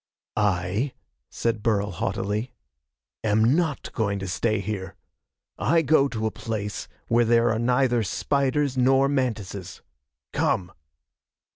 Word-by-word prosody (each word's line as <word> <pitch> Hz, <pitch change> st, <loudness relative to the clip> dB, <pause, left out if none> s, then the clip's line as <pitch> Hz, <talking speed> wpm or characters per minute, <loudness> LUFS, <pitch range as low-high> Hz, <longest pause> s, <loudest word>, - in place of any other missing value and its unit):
"I," 105 Hz, +5 st, 0 dB, 0.4 s
said 115 Hz, -2 st, -1 dB
Burl 105 Hz, -3 st, +1 dB
haughtily, 105 Hz, +6 st, -2 dB, 0.7 s
"am 110 Hz, +4 st, +3 dB
not 160 Hz, -5 st, -1 dB
going 100 Hz, -3 st, 0 dB
to 95 Hz, 0 st, -4 dB
stay 110 Hz, +3 st, 0 dB
here. 100 Hz, -1 st, -4 dB, 0.6 s
I 165 Hz, -1 st, +3 dB
go 140 Hz, -2 st, +4 dB
to 110 Hz, -4 st, -3 dB
a 110 Hz, -, 0 dB
place 105 Hz, -2 st, -4 dB, 0.2 s
where 120 Hz, +1 st, +4 dB
there 115 Hz, 0 st, +4 dB
are 110 Hz, -, 0 dB
neither 125 Hz, 0 st, +2 dB
spiders 140 Hz, +6 st, 0 dB
nor 135 Hz, +1 st, +4 dB
mantises. 110 Hz, -9 st, -3 dB, 0.5 s
Come!" 90 Hz, -2 st, 0 dB
115 Hz, 120 wpm, -25 LUFS, 105-130 Hz, 0.7 s, go